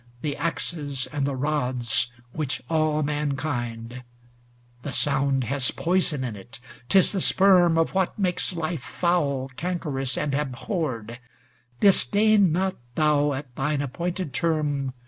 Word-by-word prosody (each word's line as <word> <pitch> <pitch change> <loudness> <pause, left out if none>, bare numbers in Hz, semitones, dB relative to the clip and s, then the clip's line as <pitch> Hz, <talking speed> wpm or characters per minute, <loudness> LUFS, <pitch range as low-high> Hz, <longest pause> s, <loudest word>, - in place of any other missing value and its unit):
The 145 -2 -1
axes 145 -4 -2
and 140 -2 0
the 140 - -2
rods 125 -5 0 0.2
which 140 -3 -3
awe 155 -1 +1
man 145 -1 -1
kind; 120 -4 -4 0.8
The 140 0 -6
sound 135 -1 +1
has 130 +2 0
poison 170 -5 0
in 120 -4 -4
it, 120 +7 -11 0.3
't - - +5
is 190 - +5
the 195 -3 -1
sperm 180 -4 +5
Of 165 - +1
what 190 -1 0
makes 180 -3 0
life 165 -3 -3
foul, 140 -5 0
cankerous, 150 -6 -2
and 145 - -1
abhorred; 130 - -3 0.6
Disdain 205 -1 +5
not 190 +3 0 0.2
thou, 150 -2 +2
at 135 -2 -7
thine 145 +2 -1
appointed 170 +2 -4
term. 145 -4 -1
150 Hz, 135 wpm, -25 LUFS, 135-170 Hz, 0.8 s, t